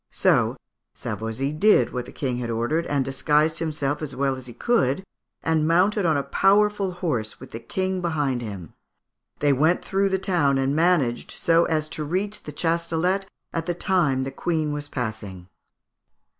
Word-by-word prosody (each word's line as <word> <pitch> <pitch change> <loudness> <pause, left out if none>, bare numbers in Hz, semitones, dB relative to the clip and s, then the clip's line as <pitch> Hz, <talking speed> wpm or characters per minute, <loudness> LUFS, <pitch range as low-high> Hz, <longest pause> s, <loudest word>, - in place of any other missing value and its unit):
So - - +2 0.4
Savoisy 115 +6 -3
did 210 +8 +4
what 125 -1 -3
the - - -9
King 130 -4 -2
had 120 -1 -3
ordered, 120 +9 -1
and 140 -2 0
disguised 150 +4 +1
himself 150 -3 -2
as 140 -4 -5
well 135 0 0
as 130 -1 -9
he 120 - -9
could, 190 - +1 0.4
and 160 -1 +1
mounted 185 +3 +3
on 155 -3 +3
a 140 - -1
powerful 200 +1 +2
horse 135 - -3
with - - -12
the 115 - -6
King 185 +7 -2
behind 145 -7 0
him. 100 -7 -7 0.7
They 145 -1 +4
went 155 +6 +2
through 195 +1 +1
the 190 - +1
town, 170 -8 +1
and 135 +1 +1
managed 155 -8 +2
so 170 0 +2
as 155 -1 0
to 155 - -3
reach 195 +7 -2
the 150 - -8
Chastelet 170 +4 0 0.3
at 165 0 -3
the 175 - -1
time 165 -8 +1
the 135 - -4
Queen 155 +1 -1
was 145 0 -4
passing. 105 -8 -5
155 Hz, 170 wpm, -24 LUFS, 135-175 Hz, 0.7 s, did